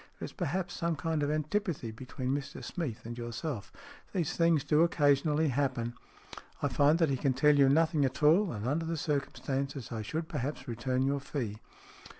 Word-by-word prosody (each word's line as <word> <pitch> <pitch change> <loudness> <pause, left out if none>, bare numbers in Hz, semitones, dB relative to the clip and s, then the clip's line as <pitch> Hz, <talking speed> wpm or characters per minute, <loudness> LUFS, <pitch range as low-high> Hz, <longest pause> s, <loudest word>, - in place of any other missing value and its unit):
There - - -5
is - - -9
perhaps 175 0 -2
some 170 -2 -1
kind 155 +2 -1
of 145 - +1
antipathy 155 - -1
between 125 +2 -5
Mr 140 +2 -4
Smeath 150 - -4
and 120 +1 -5
yourself. 120 +1 -5 0.4
These 175 -6 -1
things 165 -4 +3
do 150 +1 +3
occasion 145 -3 +3
ally 150 +2 +2
happen. 130 -4 0 0.7
I 145 - 0
find 145 +5 +4
that 165 -4 +2
he 135 - +1
can 135 0 +1
tell 150 +3 +4
you 140 -1 +6
nothing 160 +1 +3
at 135 +2 -1
all, 170 +5 +5
and 105 -1 -4
under 160 +5 0
the 165 0 -2
circumstances, 140 -3 -2
I 115 -2 -3
should 155 +10 -3
perhaps 140 +2 -4
return 125 +2 -1
your 140 +1 +1
fee." 125 -7 -4
145 Hz, 185 wpm, -31 LUFS, 130-160 Hz, 0.7 s, you